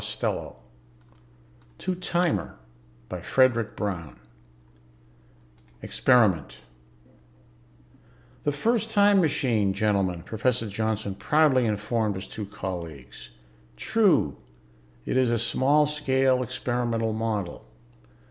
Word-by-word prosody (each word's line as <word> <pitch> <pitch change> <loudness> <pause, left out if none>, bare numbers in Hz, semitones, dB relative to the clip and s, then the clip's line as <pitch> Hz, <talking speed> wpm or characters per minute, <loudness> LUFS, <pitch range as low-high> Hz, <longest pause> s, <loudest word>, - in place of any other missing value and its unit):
_ - - -5 1.6
Illustrated 180 -2 0 0.7
by - - -6
STONE 105 - 0 1.7
Experiment 110 - +2 1.8
"The 145 - +1
first 225 +9 0
time 205 -2 +4
machine, 120 - +1
gentlemen," 95 -5 0
Professor 115 +3 -1
Johnson 110 -1 -2
proudly 135 +1 +3
informed 105 0 -1
his 95 +1 -6
two 105 +1 -7
colleagues. 85 - -7 0.5
"True, 195 - +2 0.7
it - - -1
is 130 -2 +3
a 120 - +1
small 140 +6 +3
scale 135 -3 +1
experimental 120 -2 -2
model. 110 - -3
115 Hz, 80 wpm, -26 LUFS, 100-140 Hz, 1.8 s, time